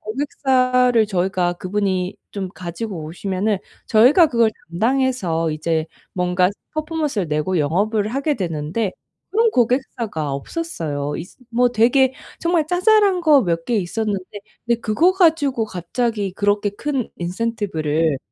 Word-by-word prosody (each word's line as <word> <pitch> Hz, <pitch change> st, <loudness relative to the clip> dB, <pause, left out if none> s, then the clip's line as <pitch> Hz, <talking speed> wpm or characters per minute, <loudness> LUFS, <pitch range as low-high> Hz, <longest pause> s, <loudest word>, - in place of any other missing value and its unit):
고객사를 255 Hz, -2 st, +2 dB
저희가 180 Hz, -2 st, 0 dB
그분이 185 Hz, 0 st, -2 dB
좀 195 Hz, -2 st, -4 dB
가지고 180 Hz, +1 st, -5 dB
오시면은 190 Hz, +5 st, -2 dB, 0.3 s
저희가 255 Hz, +10 st, +6 dB
그걸 230 Hz, -4 st, +3 dB, 0.2 s
담당해서 215 Hz, -6 st, 0 dB
이제 155 Hz, +1 st, -1 dB, 0.3 s
뭔가 180 Hz, 0 st, +2 dB, 0.3 s
퍼포먼스를 305 Hz, -, -2 dB
내고 155 Hz, +4 st, 0 dB
영업을 205 Hz, +8 st, +1 dB
하게 280 Hz, +5 st, 0 dB
되는데 175 Hz, +2 st, -2 dB, 0.4 s
그런 450 Hz, +2 st, +3 dB
고객사가 230 Hz, -, 0 dB
없었어요. 145 Hz, -, -4 dB
있으 175 Hz, -, -9 dB
뭐 245 Hz, +1 st, +3 dB
되게 250 Hz, +3 st, +3 dB, 0.3 s
정말 335 Hz, -2 st, +1 dB
자잘한 385 Hz, +2 st, +3 dB
거 300 Hz, -5 st, +5 dB
몇 165 Hz, -4 st, -1 dB
개 240 Hz, -, +1 dB
있었는데 205 Hz, +1 st, -3 dB, 0.2 s
근데 235 Hz, 0 st, 0 dB
그거 295 Hz, +13 st, +3 dB
가지고 315 Hz, -, +2 dB
갑자기 205 Hz, +2 st, -2 dB
그렇게 205 Hz, +1 st, +1 dB
큰 265 Hz, +3 st, -3 dB
인센티브를 170 Hz, -, -1 dB
215 Hz, 300 characters per minute, -20 LUFS, 180-260 Hz, 0.4 s, 저희가